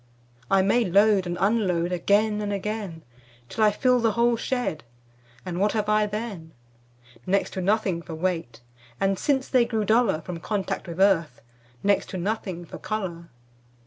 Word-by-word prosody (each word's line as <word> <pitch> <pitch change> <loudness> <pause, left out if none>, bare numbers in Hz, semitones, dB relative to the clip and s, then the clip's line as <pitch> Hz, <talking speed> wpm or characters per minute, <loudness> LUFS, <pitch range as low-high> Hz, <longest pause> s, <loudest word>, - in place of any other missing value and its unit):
I 195 -1 +4
may 235 +5 +3
load 200 0 +3
and 175 0 -3
unload 185 -4 +1
Again 210 +4 +2
and 205 -1 -2
again 200 -4 -4 0.5
Till 220 - 0
I 215 - +7
fill 250 +4 +2
the 225 -2 +2
whole 235 +1 +3
shed, 245 -9 -2 0.6
And 180 -1 -4
what 205 +2 +2
have 210 -1 -1
I 210 0 +3
then? 205 -7 -6 0.7
Next 195 +2 +1
to 190 - -3
nothing 195 -3 +1
for 165 -1 -8
weight, 165 -9 -3 0.4
And 195 -1 +1
since 270 -2 +1
they 255 -3 +4
grew 225 -3 -1
duller 220 -6 +2
From 170 +1 -6
contact 195 +1 -3
with 170 +1 -7
earth, 170 -9 +3 0.4
Next 200 0 +2
to 190 - -5
nothing 185 -2 -3
for - - -10
color. 180 -6 -4
200 Hz, 165 wpm, -25 LUFS, 175-215 Hz, 0.7 s, I